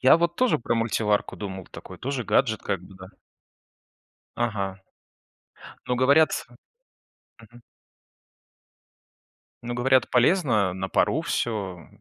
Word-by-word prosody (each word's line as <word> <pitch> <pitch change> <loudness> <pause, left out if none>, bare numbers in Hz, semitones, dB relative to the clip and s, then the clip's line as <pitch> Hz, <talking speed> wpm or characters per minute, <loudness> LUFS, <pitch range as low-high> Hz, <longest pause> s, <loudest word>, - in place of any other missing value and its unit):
Я 130 +4 +7
вот 170 0 0
тоже 255 -1 +2
про 120 0 -1
мультиварку 110 -2 0
думал, 95 -3 -7
такой - - -11
тоже 135 -1 -3
гаджет 110 -2 +1
как 95 - -2
бы, 90 +2 -15
да. 95 0 -12 1.3
Ага, 100 -5 -2 1.1
но 125 - 0
говорят 140 +5 +5 1.1
мгм. 120 +2 -17 2.0
Но 120 - -4
говорят, 130 +1 +3
полезно 125 - +2
на 95 +1 -4
пару - - +2
всё, 95 -8 -3
115 Hz, 110 wpm, -25 LUFS, 95-130 Hz, 2.0 s, Я